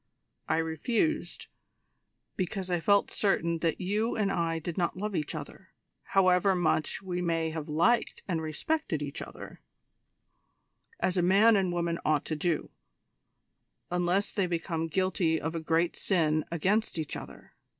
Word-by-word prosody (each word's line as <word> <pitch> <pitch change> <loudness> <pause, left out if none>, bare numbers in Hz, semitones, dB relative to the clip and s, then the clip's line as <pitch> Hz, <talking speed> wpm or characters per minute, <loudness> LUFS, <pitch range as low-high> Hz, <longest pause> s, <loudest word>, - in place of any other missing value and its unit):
I - - +2
refused, 165 - -1 0.9
because 185 0 -3
I 175 - +2
felt 200 +4 +3
certain 170 -5 +1
that 165 -1 0
you 210 +5 0
and 200 -2 +1
I 165 -2 0
did 165 +1 -5
not 175 -1 -1
love 205 +1 -3
each 150 - -2
other - - -8 0.4
however 185 0 +4
much 160 +1 0
we 180 -1 -3
may 165 -2 0
have 155 -2 -5
liked 175 +11 +2
and 170 -4 -1
respected 160 - -2
each 145 +1 -5
other - - -9 1.4
as 185 - 0
a - - +4
man 200 +6 +5
and 190 -3 +2
woman 170 -1 -1
ought 150 -1 +1
to 155 - -2
do, 165 +1 -1 1.2
unless 180 +3 +1
they 195 -3 0
become 165 -1 -2
guilty 170 -2 +1
of 160 +2 -3
a 165 - -2
great 165 +2 +1
sin 155 -5 +1
against 190 +5 +1
each 155 -2 -3
other. - - -10
175 Hz, 150 wpm, -29 LUFS, 160-195 Hz, 1.4 s, man